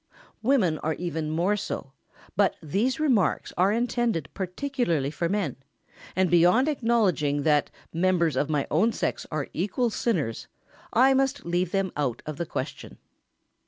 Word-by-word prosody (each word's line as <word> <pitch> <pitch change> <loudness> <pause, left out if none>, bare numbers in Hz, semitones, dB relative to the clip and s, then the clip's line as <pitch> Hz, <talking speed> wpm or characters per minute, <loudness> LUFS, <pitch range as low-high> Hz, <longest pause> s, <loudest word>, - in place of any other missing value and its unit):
Women 215 - +2
are 155 0 -1
even 160 -3 -3
more 175 +6 +1
so, 195 -8 -5 0.4
but - - +3
these 210 - -1
remarks 255 -11 +1
are 185 +3 +3
intended 235 - 0
particularly 185 - -1
for 170 +1 -2
men, 200 -1 -1 0.6
and 185 +1 +3
beyond 180 - +5
acknowledging 205 - +1
that 150 -1 +3 0.2
members 170 -3 +2
of 145 +3 0
my 145 -3 +1
own 215 +10 +3
sex - - -2
are 155 -3 -3
equal 210 +7 0
sinners, 160 - -1 0.4
I 260 +4 +5
must 270 +1 0
leave 175 +1 0
them 195 -1 0
out 140 -6 -2
of 155 -2 -5
the 170 - -3
question. - - -6
180 Hz, 145 wpm, -26 LUFS, 155-235 Hz, 0.6 s, beyond